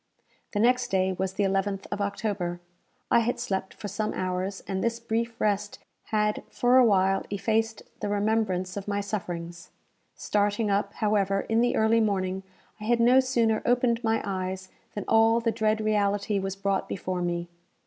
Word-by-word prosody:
The 205 - 0
next 250 +3 +3
day 190 0 +1
was 190 +1 -2
the 205 - 0
11th 195 0 0
of 205 - -2
October. 200 -4 -2 0.5
I 235 - +6
had 235 +1 -1
slept 190 -6 -3
for 215 - -6
some 210 +2 -2
hours, 185 +1 -3
and 190 -1 -2
this 230 0 0
brief 230 0 -2
rest 205 0 0 0.3
had 210 -1 0
for 245 +1 +3
awhile 195 -5 +4
effaced 220 +2 -1 0.2
the 205 - -3
remembrance 205 -3 0
of 200 -1 -5
my 205 0 0
sufferings. 175 -4 -5 0.5
Starting 205 +1 0
up, 200 0 0
however, 200 -2 +1
in 225 +1 +1
the 245 - +2
early 220 +1 +3
morning, 190 -3 0 0.4
I 210 - -7
had 240 +1 +2
no 245 +3 +6
sooner 235 -4 +2
opened 240 -1 +2
my 225 0 +1
eyes 185 -1 -4 0.3
than 205 - -4
all 225 +1 +5
the 230 -1 0
dread 220 0 +1
reality 205 -1 +1
was 195 0 -3
brought 195 0 -1
before 185 -1 -3
me. 175 0 -2
205 Hz, 170 wpm, -27 LUFS, 190-225 Hz, 0.5 s, I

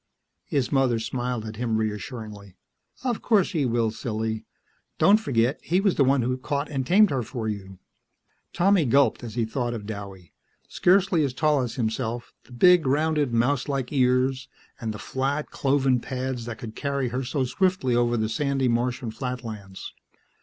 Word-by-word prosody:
His 140 -4 -1
mother 135 -4 +2
smiled 120 0 -3
at 110 -1 -7
him 115 -2 0
reassuringly. 105 -2 -5 0.5
"Of 245 -4 -1
course 205 -6 +2
he 150 -8 0
will, 115 -2 +1
silly. 110 -1 -4 0.5
Don't 200 +7 +5
forget 130 - +1
he 180 +3 +1
was 195 -2 +2
the 140 - +3
one 135 -1 +3
who 125 +2 0
caught 140 +3 -3
and 135 -3 -2
tamed 205 +5 +5
her 135 -2 0
for 115 -1 -5
you." 95 -3 -5 0.7
Tommy 190 -2 +3
gulped 130 -1 +3
as 115 -2 -7
he 120 -2 +1
thought 120 +1 -2
of 105 -3 -7
Douwie. 100 -4 -8 0.3
Scarcely 185 -3 +3
as 135 -3 -2
tall 150 -1 +2
as 120 -2 -4
himself; 120 0 -3
the - - -20
big, 175 +4 +5
rounded, 150 0 +1
mouselike 130 +2 0
ears, 130 0 +2 0.3
and 115 -3 -3
the 105 - -6
flat, 135 +6 -2
cloven 135 -2 +2
pads 130 -1 -4
that 120 -1 -6
could 110 -2 -8
carry 140 -3 -1
her 125 +3 -2
so 130 +2 -1
swiftly 130 -1 +1
over 120 0 +2
the 110 -1 0
sandy 140 +2 0
Martian 120 0 -1
flatlands. 110 -5 -6
125 Hz, 165 wpm, -25 LUFS, 115-140 Hz, 0.7 s, Don't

